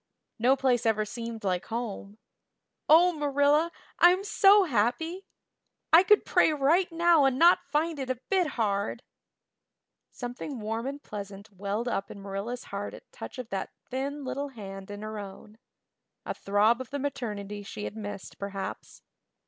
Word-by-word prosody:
No 250 +4 +4
place 250 -4 +1
ever 215 -1 +2
seemed 230 0 -6
like 185 -2 -1
home. 220 -3 -5 0.7
Oh, 345 +3 +7
Marilla, 295 +2 +2 0.3
I'm 360 +2 +6
so 410 -1 +6
happy. 320 - -1 0.7
I 330 - +10
could 410 +3 +4
pray - - +4
right 315 +5 +2
now 335 -3 +4
and 265 -1 +2
not 350 +3 +5
find 310 +1 0
it 265 -1 -4
a 255 -2 -2
bit 370 -3 +3
hard." 205 0 -1 1.1
Something 245 +2 -6
warm 225 +3 -3
and 280 +1 -6
pleasant 200 0 -8
welled 200 +4 -3
up 195 -4 -2
in 200 - -9
Marilla's 200 +5 -5
heart 200 +1 -5
at - - -16
touch - - -9
of 250 -3 -6
that 195 -1 -3 0.2
thin 280 +3 -3
little 280 +2 -3
hand 195 -5 -9
in 205 +1 -7
her 215 0 -5
own 205 +2 -10 0.7
a - - -2
throb 210 +5 +2
of 260 - -8
the 285 - -3
maternity 215 -8 -4
she 205 +1 -7
had 210 - -5
missed, 205 -3 -7
perhaps. 200 -1 -6
240 Hz, 155 wpm, -28 LUFS, 205-295 Hz, 1.1 s, I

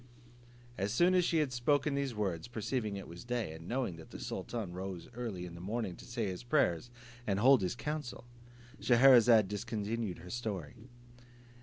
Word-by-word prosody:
As 100 +2 0
soon 175 - +4
as 180 -1 +4
she 170 - +1
had 150 -5 +1
spoken 140 +4 +2
these 140 -3 -1
words, 95 -5 -2
perceiving 110 -2 -2
it 95 - -7
was 85 +1 -9
day, 120 -8 -2
and 80 +1 -10
knowing 120 -9 -2
that 80 - -12
the - - -9
sultan 110 -7 -4
rose 95 -1 -6
early 110 -7 -4
in 85 - -8
the 85 - -9
morning 100 -1 -3
to - - -12
say 120 -2 -2
his 95 -2 -4
prayers, 120 - +1 0.4
and 100 -2 +1
hold 130 +1 +6
his 90 +3 -1
council, 150 -3 -4 0.5
Scheherazade 120 -4 +7
discontinued 110 -1 -3
her 90 +2 -10
story. 105 -10 -4
115 Hz, 175 wpm, -33 LUFS, 95-125 Hz, 0.5 s, Scheherazade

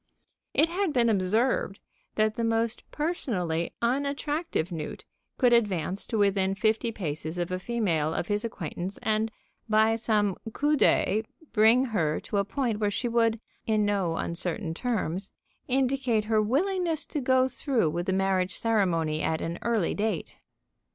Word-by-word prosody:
It 315 - +5
had 355 -1 -1
been 240 -3 +3
observed 205 +1 +1 0.4
that 215 0 +2
the 230 - -3
most 230 0 0
personally 190 - -2
unattractive 280 - -1
newt 155 -3 -6 0.3
could 245 -3 +4
advance 195 -4 +1
to 225 - -2
within 195 -2 +2
fifty 220 +3 +1
paces 160 -5 -4
of 175 +1 -2
a 185 - -1
female 180 -9 0
of - - -1
his 205 +1 0
acquaintance 185 -3 -5
and, 220 0 +1 0.4
by 220 +1 +4
some 210 -4 +1 0.2
coup 295 +1 +2
d'œil, 215 -6 +3 0.3
bring 230 +4 +5
her 170 -11 0
to 205 - -3
a 200 - +3
point 230 0 -2
where 210 -2 +1
she 220 +4 -2
would, 230 -1 +2 0.3
in 215 -2 +2
no 190 -5 0
uncertain 170 +1 -2
terms, 195 -3 -2 0.4
indicate 255 -3 +1
her 215 0 +2
willingness 330 - +1
to 295 - -3
go 260 0 +3
through 250 - 0
with 175 +2 -3
the - - +2
marriage 190 -1 +1
ceremony 170 -9 +1
at 160 - 0
an 170 +1 -4
early 225 -7 +1
date. 205 -6 -2
215 Hz, 150 wpm, -27 LUFS, 185-240 Hz, 0.4 s, It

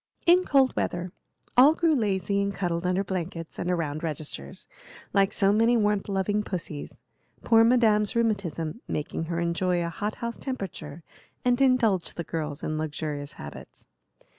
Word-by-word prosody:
In 360 +2 +5
cold 270 -2 +3
weather 175 0 -2 0.4
all 275 +6 +7
grew 330 -1 +3
lazy 200 - +1
and 200 0 0
cuddled 175 -2 -2
under 185 +2 +1
blankets 175 -3 -5
and 180 - -2
around 155 -4 -1
registers, 150 - -5 0.5
like 195 -1 +3
so 195 0 +3
many 230 +3 +4
warmth 210 -2 +1
loving 200 +2 0
pussies, 170 -7 -5 0.5
poor 225 -1 +6
Madame's 225 -2 +3
rheumatism 200 - -1
making 150 +2 -3
her 170 +1 -2
enjoy 170 +1 0
a - - -2
hot 210 +4 -3
house 235 0 -4
temperature 180 - -6 0.4
and 245 +1 +3
indulge 240 -9 +3
the 170 - -3
girls 155 -2 -4
in 155 0 -2
luxurious 150 -2 -4
habits. 70 - -11
190 Hz, 150 wpm, -27 LUFS, 165-225 Hz, 0.5 s, all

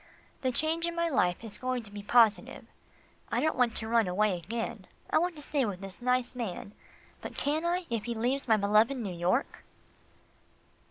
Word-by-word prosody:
The 260 - +1
change 320 +5 0
in 340 - -3
my 335 0 +1
life 180 - +1
is 220 -3 -8
going 255 -1 -2
to 205 - -10
be 205 0 -7
positive. 220 0 +3 0.7
I - - +1
don't 315 - +1
want 250 -3 +2
to 220 - -1
run 230 -2 +3
away 195 +2 +2
again. 220 +7 -5 0.2
I - - +5
want 350 +1 0
to 295 - -9
stay 280 -1 0
with 200 -6 -2
this 195 +3 -9
nice 250 0 +1
man, 215 -5 -5 0.5
but - - -7
can 300 +3 0
I, 355 +1 0
if 225 -2 -1
he 235 -1 -3
leaves 250 +5 -1
my 220 -2 +5
beloved 215 +6 +3
New 205 -7 -4
York? 175 +10 0
235 Hz, 195 wpm, -30 LUFS, 205-275 Hz, 0.7 s, I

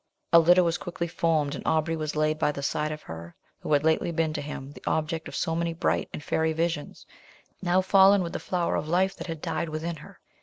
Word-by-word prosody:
A 170 - +10
litter 175 +2 +6
was 170 0 0
quickly 170 -1 -4
formed, 160 -3 0
and - - -6
Aubrey 160 +1 +1
was 155 -1 -3
laid 155 0 +1
by 150 - +2
the 140 -1 -6
side 150 +2 -1
of 150 0 -7
her 85 +1 -9 0.2
who - - -6
had 145 -1 +4
lately 160 +2 +2
been 160 -1 0
to 155 - -3
him 140 -1 -7
the - - -13
object 160 +1 -1
of - - -8
so 165 - -1
many 170 0 -1
bright - - 0
and 150 - -7
fairy 160 +1 0
visions, 165 -2 -3 0.6
now 185 +1 +3
fallen 195 +1 +5
with 170 - -5
the - - -3
flower 175 -2 -1
of 150 +1 -4
life 190 +3 +2
that - - -7
had 165 -2 -6
died 165 -1 -2
within 160 +2 -4
her. 150 - -14
160 Hz, 235 wpm, -27 LUFS, 155-170 Hz, 0.6 s, A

